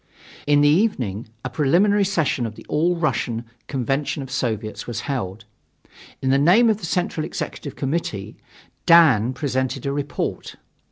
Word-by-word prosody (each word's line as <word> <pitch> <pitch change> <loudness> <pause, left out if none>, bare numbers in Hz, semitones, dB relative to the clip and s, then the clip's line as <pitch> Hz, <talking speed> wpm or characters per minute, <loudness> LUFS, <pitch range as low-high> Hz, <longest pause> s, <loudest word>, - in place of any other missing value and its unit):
In 145 0 +4
the 145 - +5
evening 130 - +1 0.2
a - - -1
preliminary 195 +8 +3
session 160 - 0
of 110 - -9
the - - -12
Second - - -9
All 170 +4 +2
Russian 120 -8 -1 0.2
Convention 135 +2 -2
of 130 - -10
Soviets 110 -3 -3
was 120 -1 -4
held. 110 -6 -4 0.8
In 130 - +2
the 135 - +4
name 205 +10 +5
of 215 - -1
the 170 - -6
Central 175 -2 -1
Executive 145 -2 -5
Committee, 135 - -3 0.5
Dan 135 -9 +6
presented 130 -1 -2
a 140 - -1
report. 145 0 -4
140 Hz, 155 wpm, -22 LUFS, 120-165 Hz, 0.8 s, Dan